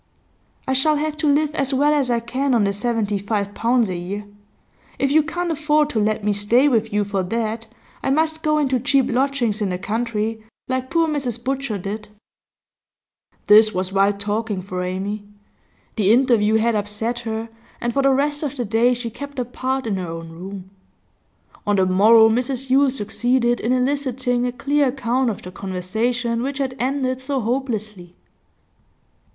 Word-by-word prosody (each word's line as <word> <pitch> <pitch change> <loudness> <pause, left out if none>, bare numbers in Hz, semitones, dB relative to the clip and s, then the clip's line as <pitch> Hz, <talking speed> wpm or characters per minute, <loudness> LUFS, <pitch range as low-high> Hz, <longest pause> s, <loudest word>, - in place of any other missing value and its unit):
'I 265 - +1
shall 300 +4 +3
have 305 +1 -2
to 315 -1 0
live 300 +1 +1
as 275 -2 0
well 290 +3 +3
as 280 -4 +1
I 235 -1 +2
can 255 +3 -1
on 225 - +3
the 200 0 +1
seventy 210 -2 -1
five 205 0 -2
pounds 235 +1 +2
a 185 - -3
year. 195 +4 -5 0.7
If 275 - 0
you 310 +2 +5
can't 345 +3 -3
afford 300 -1 +1
to 225 - 0
let 215 0 0
me 210 0 +1
stay 225 +7 +3
with 225 -5 +1
you 205 0 +1
for 200 -1 -2
that, 225 +3 -3 0.3
I - - -1
must 315 +3 +1
go 305 -1 +1
into 270 -4 +1
cheap 270 +1 +2
lodgings 245 -4 0
in 205 - 0
the 180 - -2
country, 220 +2 -2 0.2
like 260 0 -2
poor 335 -1 +2
Mrs 255 -6 -3
Butcher 270 -4 -2
did.' 205 +3 -5 1.4
This 215 0 +6
was 185 +1 -2
wild 200 +1 +2
talking 205 -1 -2
for 185 -1 -4
Amy. 195 +3 -3 0.7
The 205 -2 +3
interview 230 -3 +4
had 230 +1 +2
upset 210 +3 -2
her, 225 -1 -4 0.3
and 240 0 -2
for 275 - +2
the 275 - +4
rest 290 +2 +1
of 290 -3 -3
the 245 - -2
day 230 +4 +2
she 235 -1 -5
kept 285 +3 -9
apart 255 +1 -2
in 210 -4 -1
her 180 -2 -4
own 165 0 -7
room. 190 +2 -9 1.0
On 205 - +3
the 190 -1 +3
morrow 220 +5 +6
Mrs 255 +3 -1
Yule 275 +1 +5
succeeded 240 +1 0
in 230 - -1
eliciting 255 -2 0
a - - -1
clear 280 +3 +1
account 255 -1 0
of 210 - -5
the 180 - -8
conversation 225 +6 -2
which 270 +2 -3
had 265 -2 -2
ended 260 0 -1
so 270 +1 -2
hopelessly. 215 -7 -3
235 Hz, 180 wpm, -21 LUFS, 210-270 Hz, 1.4 s, This